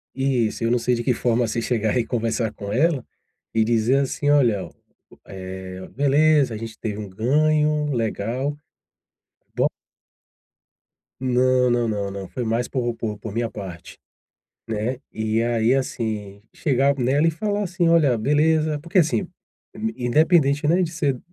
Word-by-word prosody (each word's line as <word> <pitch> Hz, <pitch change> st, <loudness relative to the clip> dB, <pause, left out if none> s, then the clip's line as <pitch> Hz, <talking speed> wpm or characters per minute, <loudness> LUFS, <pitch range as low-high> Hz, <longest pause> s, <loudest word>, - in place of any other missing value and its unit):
Isso, 130 Hz, -5 st, 0 dB
eu 115 Hz, -, +2 dB
não 125 Hz, -, +3 dB
sei 125 Hz, +1 st, +1 dB
de 120 Hz, -, -3 dB
que 125 Hz, -, +2 dB
forma, 120 Hz, 0 st, +1 dB
assim, 115 Hz, +1 st, -2 dB
chegar 110 Hz, -1 st, 0 dB
e 120 Hz, -, +1 dB
conversar 115 Hz, -2 st, -1 dB
com 100 Hz, -1 st, -7 dB
ela 145 Hz, +2 st, +1 dB, 0.5 s
e 110 Hz, -, +3 dB
dizer 115 Hz, +3 st, +2 dB
assim: 140 Hz, +1 st, -1 dB
"Olha, 120 Hz, -9 st, +3 dB, 0.6 s
eh, 95 Hz, -1 st, -8 dB
beleza 145 Hz, -1 st, +3 dB
a -, -, -4 dB
gente 110 Hz, 0 st, -7 dB
teve 105 Hz, -2 st, -4 dB
um 105 Hz, -, -6 dB
ganho 150 Hz, +7 st, +1 dB
legal, 120 Hz, +5 st, -2 dB, 1.0 s
bom." -, -, +2 dB, 1.5 s
Não, 130 Hz, 0 st, +2 dB
não, 120 Hz, -1 st, +1 dB
não, 100 Hz, -2 st, -2 dB
não, 100 Hz, -1 st, -6 dB
foi 125 Hz, -, -4 dB
mais 115 Hz, +2 st, -1 dB
por 120 Hz, -3 st, -2 dB
por 110 Hz, -1 st, -5 dB
minha 115 Hz, 0 st, -1 dB
parte, 90 Hz, -5 st, -9 dB, 0.7 s
né, 115 Hz, +3 st, -2 dB
e 110 Hz, +1 st, -1 dB
aí, 115 Hz, 0 st, +2 dB
assim, 110 Hz, -6 st, -3 dB
chegar 140 Hz, -1 st, +2 dB
nela 135 Hz, +5 st, +2 dB
e 165 Hz, -, +3 dB
falar 205 Hz, +5 st, -2 dB
assim: 180 Hz, -2 st, 0 dB
"Olha 150 Hz, -8 st, +4 dB
beleza." 155 Hz, +4 st, +2 dB
Porque 170 Hz, +6 st, -3 dB
assim, 170 Hz, +3 st, +1 dB, 0.5 s
in 210 Hz, -, -4 dB
independente, 150 Hz, +1 st, +3 dB
né, 175 Hz, +4 st, +3 dB
de 165 Hz, -, -1 dB
ser 145 Hz, -6 st, -1 dB
125 Hz, 150 wpm, -23 LUFS, 110-145 Hz, 1.5 s, Olha